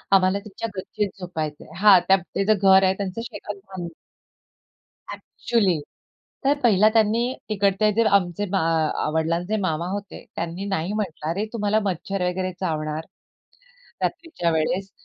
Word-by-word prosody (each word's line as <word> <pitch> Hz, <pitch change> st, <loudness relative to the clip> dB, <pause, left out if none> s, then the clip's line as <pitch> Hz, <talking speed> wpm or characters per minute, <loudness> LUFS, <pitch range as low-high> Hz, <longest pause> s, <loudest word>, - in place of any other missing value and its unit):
आम्हाला 190 Hz, +1 st, +3 dB
त्यांच्या 210 Hz, +2 st, -6 dB
गच्चीत 205 Hz, +2 st, -2 dB
झोपायचंय. 160 Hz, -5 st, -5 dB
हां, 200 Hz, -1 st, +7 dB
त्या 195 Hz, -, +6 dB
ते 195 Hz, +2 st, -3 dB
जे 215 Hz, -, +5 dB
घर 190 Hz, -1 st, +5 dB
आहे 190 Hz, 0 st, +4 dB
त्यांच 195 Hz, -2 st, -3 dB
शेतात 220 Hz, -3 st, -6 dB
बां 185 Hz, -3 st, -6 dB, 1.3 s
अ‍ॅक्चुअली! 200 Hz, -9 st, 0 dB, 0.7 s
तर 285 Hz, +1 st, +3 dB
पहिला 215 Hz, -3 st, +5 dB
त्यांनी 220 Hz, 0 st, +3 dB, 0.3 s
तिकडचे 205 Hz, 0 st, +2 dB
जे 230 Hz, +3 st, +3 dB
आमचे 180 Hz, +1 st, -3 dB
मा 195 Hz, -, +2 dB, 0.5 s
वडिलांचे 170 Hz, +6 st, 0 dB
मामा 170 Hz, -3 st, -1 dB
होते 200 Hz, -1 st, -6 dB
त्यांनी 170 Hz, +3 st, -4 dB
नाही 195 Hz, -1 st, -2 dB
म्हंटलं, 180 Hz, -7 st, -3 dB
"अरे, 195 Hz, +6 st, -1 dB
तुम्हाला 210 Hz, -1 st, +1 dB
मच्छर 195 Hz, +1 st, -2 dB
वगैरे 185 Hz, +1 st, -2 dB
चावणार 155 Hz, -3 st, -2 dB, 1.0 s
रात्रीच्या 330 Hz, -, -1 dB
वेळेस, 180 Hz, +5 st, -1 dB
195 Hz, 135 wpm, -23 LUFS, 175-210 Hz, 1.3 s, हां